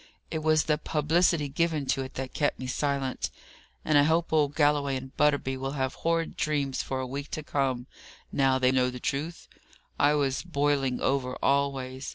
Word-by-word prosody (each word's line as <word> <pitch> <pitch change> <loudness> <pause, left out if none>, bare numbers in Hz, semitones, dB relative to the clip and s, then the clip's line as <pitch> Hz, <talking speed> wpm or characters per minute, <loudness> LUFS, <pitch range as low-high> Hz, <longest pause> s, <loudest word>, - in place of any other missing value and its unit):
It 160 - -1
was 155 0 +3
the 150 -1 +1
publicity 155 0 +2
given 155 0 0
to 135 - -2
it 130 0 -7
that 130 -1 -5
kept 145 - 0
me 130 - -6
silent; 135 0 -1 0.6
and 155 -2 +5
I - - +7
hope 160 +3 +1
old 150 -2 +2
Galloway 145 -2 +2
and 130 0 -7
Butterby 145 -3 +2
will 135 +1 -3
have 130 -2 -1
horrid 165 0 -1
dreams 145 -4 -1
for 130 - -3
a 130 - -2
week 140 +3 -5
to 155 - -4
come, 135 -4 -1 0.5
now 135 -1 +3
they 130 -1 +3
know 130 -1 +2
the 125 0 -7
truth! 150 +7 -3 0.5
I 145 +1 +4
was 140 -2 0
boiling 140 -6 0
over 130 -2 0
always. 135 -2 0
140 Hz, 185 wpm, -28 LUFS, 130-150 Hz, 0.6 s, I